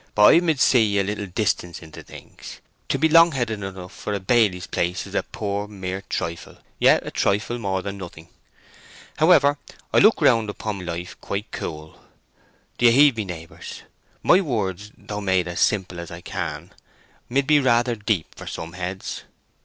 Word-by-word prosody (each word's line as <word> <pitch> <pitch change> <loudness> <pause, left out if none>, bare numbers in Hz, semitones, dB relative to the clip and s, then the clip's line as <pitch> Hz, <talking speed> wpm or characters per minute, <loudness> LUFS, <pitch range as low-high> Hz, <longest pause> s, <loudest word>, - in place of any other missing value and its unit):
But 105 0 +7
I 165 - +7
mid 160 -5 0
see 110 -7 +4
a 100 - +3
little 105 +1 -4
distance 90 -3 -2
into 80 - -11
things! - - -12 0.3
To - - +1
be 160 - +3
long 165 +1 +6
headed 115 -5 -2
enough 95 -2 -7
for 105 - -5
a - - -2
baily's 95 -3 +2
place 90 +1 -2
is - - -12
a - - +1
poor 100 0 -4
mere 95 -2 -5
trifle—yet 85 -2 0
a - - -5
trifle 105 +4 0
more 95 -3 -2
than 100 0 -6
nothing. 85 -3 -10 0.9
However, 150 -3 +4 0.3
I - - +6
look 215 +3 +5
round 115 -8 +3
upon 100 -3 -5
life 85 +2 -6
quite 100 +2 -5
cool. 80 -1 -7 0.8
Do 120 - +6
you - - +7
heed 140 +1 +6
me, 110 -2 -3
neighbours? 85 -3 -9 0.4
My 185 - +5
words, 105 - -3
though 105 0 -6
made 95 -3 +1
as 85 -1 -4
simple 90 -4 0
as 85 - -7
I 85 +1 -9
can, - - -5 0.6
mid 135 +3 +1
be 150 +1 +5
rather 120 -2 +2
deep 105 -5 -2
for - - -11
some 80 +1 -6
heads." 95 +1 -5
100 Hz, 175 wpm, -23 LUFS, 90-120 Hz, 0.9 s, But